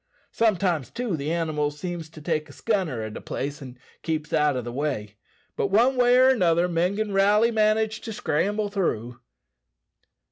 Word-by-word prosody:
Sometimes, 185 - +1
too, 235 -6 -3
the 150 +1 -3
animals 150 -3 -1
seems 170 -1 -5
to 155 -1 -13
take 155 -1 -2
a - - -11
scunner 170 - -1
at 110 - -7
a - - -7
place, 145 +3 -5
and 130 -2 -10 0.2
keeps 155 -2 -3
out 150 -3 +2
o' - - -1
the 120 0 -6
way. 125 -7 -3 0.4
But - - 0
one 240 +7 +3
way 245 0 +4
or 255 +1 +6
another 175 -8 +3
men 175 +3 0
gin' 215 0 -2
rally 205 +4 +4
manage 220 0 +1
to 225 - -6
scramble 205 +3 -1
through." 125 - -2
170 Hz, 175 wpm, -25 LUFS, 150-215 Hz, 0.4 s, or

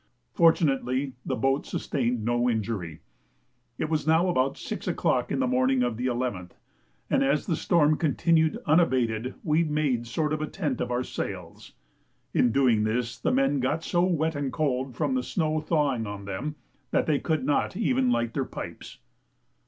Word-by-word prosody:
Fortunately 135 - +2
the - - -2
boat 135 +4 +1
sustained 120 -5 -2
no 120 +1 +2
injury. 105 -8 -3 0.8
It - - -1
was 155 -1 -1
now 165 +3 +4
about 135 -5 +1
6 - - -6
o'clock - - 0
in - - 0
the - - +2
morning 130 +1 +2
of 120 -2 -1
the 125 +3 -2
11th, 120 -8 -3 0.5
and - - +2
as 140 +2 +1
the 170 - 0
storm 155 -3 +3
continued 160 +1 +2
unabated 130 -7 +2
we 155 +1 +2
made 150 -6 0
a - - -10
sort 150 +6 -1
of 155 0 -3
tent 150 -10 -2
of - - -2
our 125 +1 0
sails. - - -6 0.6
In 120 - +3
doing 120 -5 +3
this 115 +2 -1
the - - 0
men 135 +2 +2
got 145 +6 -1
so 175 +1 +1
wet 160 -3 +1
and 145 -3 -2
cold, 130 -4 -1
from 260 - 0
the 255 - +1
snow 155 -9 -1
thawing 145 -8 0
on 100 -1 -7
them, 115 +11 -4 0.3
that - - +1
they 150 -3 +1
could 155 -5 -1
not 145 +5 0
even 255 +3 +2
light 120 - 0
their - - 0
pipes. - - -8
135 Hz, 175 wpm, -27 LUFS, 120-155 Hz, 0.8 s, now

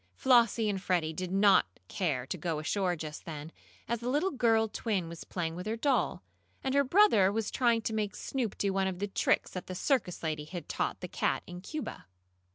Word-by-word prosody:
Flossie 235 -3 +4
and 195 -2 -1
Freddie 170 -4 0
did 180 +2 -4
not 195 - +4
care 145 -10 -1
to 140 - -4
go 165 -2 -2
ashore 180 +3 0
just 155 -2 -7
then, 155 -1 -7 0.4
as 235 0 -1
the 240 +2 -3
little 300 +9 +1
girl 225 -3 +3
twin 205 -5 -2
was 165 0 -8
playing 165 -3 -3
with 180 +4 -6
her 220 - -1
doll, 265 +3 0 0.4
and 265 - 0
her 280 0 +4
brother 270 - +5
was 220 +1 -2
trying 235 -3 +2
to 220 - -2
make 210 -1 -1
Snoop 245 -7 -3
do 200 -1 0
one 195 0 +1
of 185 -2 -3
the 200 - -1
tricks 195 - +1
that 185 - -6
the 185 - -5
circus 215 - 0
lady 155 -2 -2
had 170 -1 -7
taught - - -2
the - - -4
cat - - -1
in 180 0 -8
Cuba. 305 - -6
195 Hz, 210 wpm, -31 LUFS, 175-230 Hz, 0.4 s, brother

